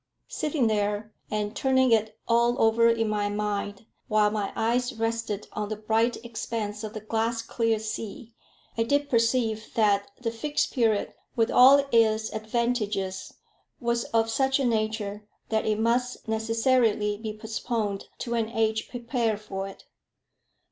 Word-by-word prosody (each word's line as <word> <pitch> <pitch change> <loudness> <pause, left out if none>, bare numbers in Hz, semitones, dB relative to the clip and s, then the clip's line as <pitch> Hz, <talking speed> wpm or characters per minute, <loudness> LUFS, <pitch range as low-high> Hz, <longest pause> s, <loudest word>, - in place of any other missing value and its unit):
Sitting 300 -4 0
there, 210 0 0 0.2
and 210 0 -2
turning 260 -1 +3
it 220 -1 +2
all 235 +2 +3
over 230 +1 +5
in 225 -1 +1
my 210 -1 0
mind, 205 0 -3 0.2
while 210 -1 +3
my 210 -2 -2
eyes 245 +2 0
rested 225 -2 -2
on 210 -1 -3
the 215 - -2
bright 220 +3 +1
expanse 220 -2 -4
of 215 0 -5
the - - -3
glass 225 +2 -1
clear 230 -1 0
sea, 220 +1 -6 0.4
I 230 - 0
did 285 +5 +1
perceive 230 -2 +1
that 205 -3 +2
the 235 -2 -2
Fixed 290 +6 -1
Period, 225 -5 +1 0.2
with 225 -2 +2
all 275 +3 +7
its 220 -1 +3
advantages, 215 -4 -2 0.4
was 235 -1 0
of 225 0 +1
such 265 +4 +2
a 270 - +1
nature 215 -2 -1 0.2
that 220 -1 0
it 215 -1 +1
must 240 +2 0
necessarily 225 -1 +1
be 220 0 -5
postponed 220 -2 -3 0.2
to 235 - -3
an 225 -2 0
age 220 -1 0
prepared 235 -3 -1
for 195 -2 -5
it. 195 - -12
225 Hz, 150 wpm, -27 LUFS, 215-235 Hz, 0.4 s, all